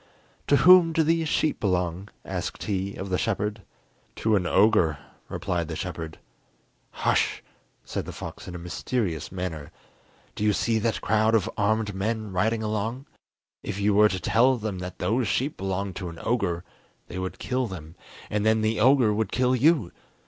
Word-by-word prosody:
"To 145 - +5
whom 165 +3 +7
do 160 - +3
these 165 0 +1
sheep 155 - +1
belong?" 90 -1 -1 0.2
asked - - -4
he 100 -1 -2
of 95 0 -6
the 90 - +1
shepherd. 105 +1 -1 0.5
"To 110 -1 +1
an 90 -3 +1
ogre," 90 -5 +4 0.3
replied 85 -2 -2
the 80 - -5
shepherd. 80 -2 -5 0.7
"Hush," - - 0 0.4
said - - -4
the - - -4
fox - - -8
in 90 - -7
a - - -4
mysterious 90 0 -3
manner. 85 -5 -5 0.6
"Do - - -4
you 105 0 +3
see 115 +2 +1
that 115 +1 -1
crowd 110 +1 +2
of 110 -2 +2
armed 105 0 +1
men 110 +2 -2
riding 110 +4 0
along? 110 +5 -2 0.6
If 100 - -5
you 100 +1 +2
were 105 +1 +6
to 95 - -2
tell 125 +7 +3
them 105 -4 -4
that 90 0 -6
those 110 +6 0
sheep 135 +9 0
belonged 95 0 -3
to 90 - -4
an 85 - -10
ogre, 100 -8 0 0.4
they 90 - -6
would 95 0 -4
kill 130 -1 -1
them, 80 -5 -9 0.4
and 105 0 0
then 110 0 +3
the 110 +1 0
ogre 125 -2 +5
would 105 -1 -1
kill 125 +1 +2
you! 140 - +3
105 Hz, 175 wpm, -26 LUFS, 90-115 Hz, 0.7 s, whom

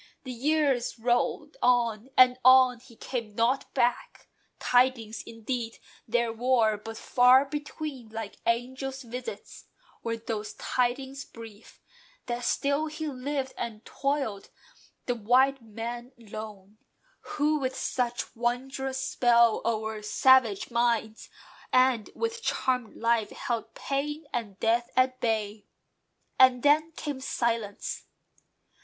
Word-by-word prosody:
The 255 - -6
years 275 -1 +1
rolled 240 - 0
on, 235 -1 +2
and 255 0 +6
on: 255 -1 +7
he 240 -1 -17
came 230 -4 -5
not 240 +4 +1
back. 240 0 0 0.3
Tidings, 245 -3 +2
indeed, 230 0 -4 0.3
there 235 0 +1
were; 230 -2 +2
but 225 +2 -8
"far 255 +2 +5
between, 290 -3 -6
Like 220 -2 -6
angel 255 +3 -1
visits," 255 - -8 0.4
were 230 -1 -2
those 215 -2 -5
tidings 265 +2 -2
brief, 225 -2 -13 0.4
That 240 0 -3
still 280 +5 +1
he 310 0 -4
lived, 270 0 -3
and 225 -1 -6
toiled, 275 -8 -2 0.6
the 245 - 0
white 255 +4 +3
man 235 +3 -7
lone, 215 -2 -10 0.6
Who 300 +1 +2
with 260 -1 -2
such 245 -2 -2
wondrous 260 +3 -2
spell 235 -3 +3
o'er 220 -1 -2
savage 230 -1 +3
minds, 235 -2 0 0.4
And 255 -4 +3
with 460 0 -2
charmed 250 - -1
life, 230 -2 +1
held 235 -2 -4
pain 295 +3 -3
and 210 -5 -4
death 235 +1 +1
at 255 0 +2
bay. 215 -2 -1 0.7
And 255 -2 +6
then 305 +3 +4
came 290 -3 -5
silence. 230 -5 -2
245 Hz, 115 wpm, -28 LUFS, 225-265 Hz, 0.7 s, on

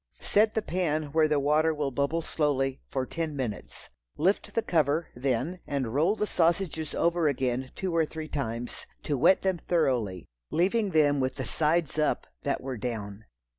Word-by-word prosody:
Set 215 +1 +2
the 220 - +1
pan 160 -4 0
where 160 0 +4
the 150 -1 +2
water 155 +3 +2
will 145 -2 -1
bubble 140 +6 0
slowly, 135 -4 0
for 130 -1 -2
ten 160 +1 -3
minutes. 120 -7 -5 0.3
Lift 185 +6 +1
the 230 - +2
cover 160 0 +1
then, 135 +7 -1
and 130 -5 -2
roll 165 +9 +3
the 210 - 0
sausages 165 -4 0
over 170 -1 +2
again 130 -2 -1
two 185 -3 -2
or 165 - +4
three 155 0 -6
times, 120 -5 -4 0.2
to 145 - -1
wet 170 +8 +4
them 190 -2 +1
thoroughly, 125 - 0 0.2
leaving 200 +5 +2
them 145 -4 +3
with 130 -1 0
the - - -4
sides 155 0 +1
up 155 - +1 0.2
that 140 - -1
were 130 -1 -4
down. 105 -2 -5
150 Hz, 170 wpm, -28 LUFS, 130-165 Hz, 0.3 s, where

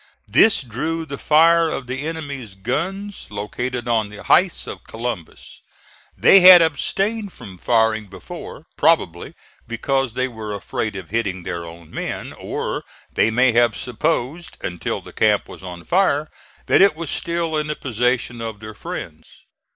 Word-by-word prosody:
This 220 -9 +5
drew 155 +8 -3
the 140 -2 -7
fire 165 +2 +5
of 135 - -4
the 130 +4 -4
enemy's 140 -10 -6
guns 180 - -3
located 120 +4 -4
on 110 -3 +1
the 105 -1 -11
heights 185 -1 +3
of - - -8
Columbus. 115 -7 -6 0.6
They 195 - +7
had 180 -1 +11
abstained 195 +7 -1
from 95 -2 -12
firing 110 -1 +2
before, - - -10
probably - - +2 0.3
because 135 +1 -1
they 130 +1 0
were 110 -4 -6
afraid 105 +2 -3
of 95 -3 -7
hitting 95 -4 -2
their 85 0 -5
own 85 -1 -12
men; - - -5
or - - -4 0.3
they 110 - +3
may 125 +3 +4
have 120 +1 +3
supposed, 150 +5 -2
until 90 -2 -3
the - - -13
camp - - +2
was - - -11
on 90 -2 -9
fire, 155 -5 +2 0.3
that - - +4
it 195 -5 +6
was 165 -1 -5
still 170 -1 -1
in 150 0 -1
the 150 - -2
possession 125 -1 -1
of 110 -2 -5
their 110 0 -9
friends. - - -7
125 Hz, 155 wpm, -21 LUFS, 110-160 Hz, 0.6 s, had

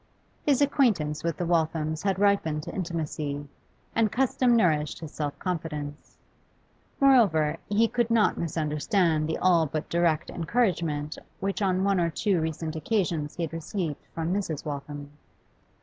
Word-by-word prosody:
His 285 -1 +3
acquaintance 205 - +1
with 165 -2 -1
the 175 - -2
Walthams 160 -2 0
had 195 -1 0
ripened 195 -7 +2
to - - -7
intimacy, 155 -5 -3 0.5
and 220 -2 +2
custom 255 -1 +2
nourished 155 -9 +2
his 160 -2 -8
self 145 -2 -4
confidence; 150 -5 -5 0.8
moreover, 210 - +4
he 215 +3 +3
could 235 0 0
not 230 -2 +3
misunderstand 160 +1 0
the 160 - -1
all 170 -3 +3
but 155 +2 -3
direct 170 -2 +1
encouragement 165 -6 -1 0.2
which 195 +2 -2
on 190 -1 +2
one 195 -1 +2
or 170 -1 +2
two 180 +1 0
recent 160 0 -3
occasions 160 -3 -1
he 175 - -2
had 165 - -4
received 165 -1 -3
from 165 +2 -2
Mrs. 185 -7 -2
Waltham. 145 0 -6
165 Hz, 145 wpm, -27 LUFS, 150-200 Hz, 0.8 s, moreover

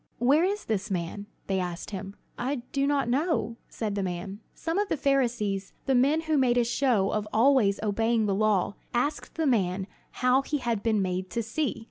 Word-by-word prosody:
"Where 275 +7 +4
is 405 +3 -1
this 210 -1 -2
man?" 190 +2 -3 0.2
they 190 -1 0
asked 180 +2 -4
him. 195 0 -6 0.2
"I 255 0 -2
do 275 0 +1
not 280 -3 +1
know," 250 - 0
said 215 -3 -3
the 200 - -1
man. 190 +2 -4 0.2
Some 330 +4 -2
of 415 - 0
the - - 0
Pharisees, 235 -9 0
the 270 - +2
men 275 +6 +3
who 315 -2 +1
made 245 -2 +3
a 240 - +4
show 235 -4 +1
of 210 0 -1
always 225 -4 +4
obeying 225 +2 +1
the 200 - +1
law, 200 -2 +2 0.2
asked 290 +5 -1
the 325 - 0
man 190 -7 +1 0.4
how 255 +2 +5
he 295 +2 -2
had 235 -6 -1
been 215 -3 +1
made 185 0 -2
to 230 +6 -2
see. 260 +6 -2
230 Hz, 195 wpm, -27 LUFS, 200-275 Hz, 0.4 s, how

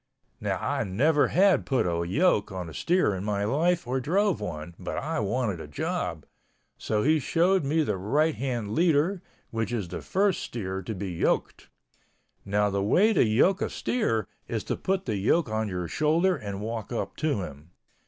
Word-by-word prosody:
Now - - -1
I - - -1
never 145 +11 +2
had 190 +1 +4
put 135 -3 +1
a 85 -1 0
yoke 140 - +2
on 90 -2 -5
a 80 - -9
steer 175 - +2
in 95 0 -4
my 100 -1 -1
life, 165 +10 +1
or 130 +2 -1
drove 190 - +1
one, 80 -4 -5
but - - -5
I 160 +1 -2
wanted 105 -3 -1
a - - -8
job, 80 +2 -3 0.5
so 105 -1 -1
he 155 +1 +4
showed 175 +6 +2
me 155 +3 +2
the 100 - -1
right 145 - +1
hand 120 -7 -3
leader, 170 +2 +2 0.3
which 115 0 -2
is 105 -7 -2
the 90 - -5
first 195 -1 +1
steer 95 -5 -4
to 105 +4 -5
be 95 0 -4
yoked. 85 - -1 0.7
Now 105 +1 +1
the 100 0 0
way 195 - +4
to - - +4
yoke 125 - +3
a - - 0
steer 115 - -1 0.2
is - - -3
to - - -2
put 190 0 -1
the 110 -4 -1
yoke 120 - +2
on 110 0 -1
your 90 -2 -3
shoulder 165 - +2
and 100 - -6
walk 110 +1 -4
up 120 - -3
to 145 -11 0
him. 75 0 -10
115 Hz, 190 wpm, -27 LUFS, 100-165 Hz, 0.7 s, had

